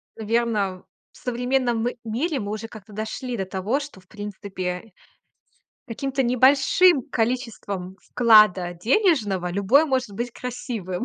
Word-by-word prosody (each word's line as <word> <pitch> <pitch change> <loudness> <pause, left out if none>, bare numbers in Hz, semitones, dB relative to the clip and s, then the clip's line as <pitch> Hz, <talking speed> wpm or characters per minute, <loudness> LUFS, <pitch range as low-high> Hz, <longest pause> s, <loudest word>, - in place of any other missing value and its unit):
наверно, 215 -4 -1 0.3
в - - -20
современном 245 -1 0 0.2
мире 265 +7 -2
мы 205 -1 -4
уже 215 +1 -5
как-то 215 -2 -13
дошли 220 +4 -4
до 190 - -2
того, 190 +8 -1
что, 285 -9 -9
в 185 - -24
принципе, 200 -1 -6 1.0
каким-то 270 +3 -2
небольшим 270 +5 +4
количеством 225 -6 -3
вклада 215 -7 +5
денежного 210 - +1
любой 200 - +3
может 260 -4 -1
быть 235 +5 -4
красивым, 235 -7 -5
225 Hz, 120 wpm, -23 LUFS, 195-255 Hz, 1.0 s, вклада